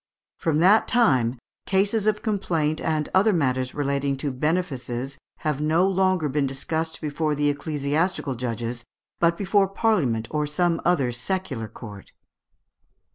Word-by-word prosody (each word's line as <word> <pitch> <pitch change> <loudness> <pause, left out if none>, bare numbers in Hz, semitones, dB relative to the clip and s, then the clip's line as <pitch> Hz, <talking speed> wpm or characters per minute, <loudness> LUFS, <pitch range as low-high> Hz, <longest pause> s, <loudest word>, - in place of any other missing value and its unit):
From 160 -2 +1
that 200 +5 +5
time 130 - +3 0.3
"cases 200 +2 +2
of 210 -1 +1
complaint 165 -8 0
and 155 -2 0
other 200 +4 +5
matters 130 -7 0
relating 140 -1 -1
to 140 +1 -2
benefices 135 -3 -2 0.2
have 150 -2 -1
no 160 +5 +3
longer 185 -4 +2
been 140 0 0
discussed 160 +4 -3
before 150 0 -1
the 145 0 +2
ecclesiastical 145 +2 -1
judges, 120 -1 -4 0.4
but 170 0 +3
before 200 0 +2
Parliament 160 - 0
or 150 -1 0
some 170 +3 +1
other 140 -9 +2
secular 120 - -3
court." 105 -3 -11
150 Hz, 130 wpm, -24 LUFS, 135-185 Hz, 0.4 s, that